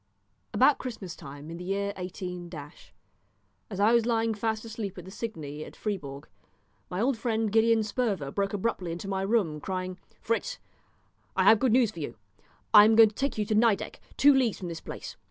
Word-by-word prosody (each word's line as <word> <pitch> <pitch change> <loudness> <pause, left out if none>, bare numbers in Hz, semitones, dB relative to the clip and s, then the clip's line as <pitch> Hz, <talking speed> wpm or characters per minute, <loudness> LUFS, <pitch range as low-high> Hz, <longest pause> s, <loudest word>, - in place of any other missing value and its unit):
About 270 +3 +4
Christmas 215 -9 -6
time 145 +3 -10
in 170 - -6
the 175 - -7
year 200 +2 -1
18, 180 -1 -6 1.2
as 190 - -6
I 215 +3 +5
was 235 -1 +3
lying 225 -1 +1
fast 220 +1 -2
asleep 215 -4 -5
at 180 - -8
the 190 - -10
Cygne 155 -10 -6
at - - -11
Fribourg, 150 -9 -5 0.6
my 180 - -3
old 240 +1 +1
friend 225 -3 0
Gideon 225 0 +4
Sperver 205 - -1
broke 195 +3 -1
abruptly 195 -4 -2
into 175 +4 -6
my 195 -1 -1
room, 195 -7 +1
crying 185 0 -4 0.2
"Fritz, - - -2 0.8
I - - +3
have 220 - +7
good 255 -1 +2
news 240 -4 +4
for 170 - -10
you; 145 -6 -5 0.6
I 210 -1 +11
am 220 +1 +5
going 225 -1 +8
to 205 - -20
take 275 -2 -1
you 210 - 0
to 215 - -1
Nideck, 220 -2 +2 0.2
two 285 +1 +7
leagues 255 -5 +2
from 180 - -6
this 165 -1 -6
place. - - -8
205 Hz, 190 wpm, -28 LUFS, 180-230 Hz, 1.2 s, I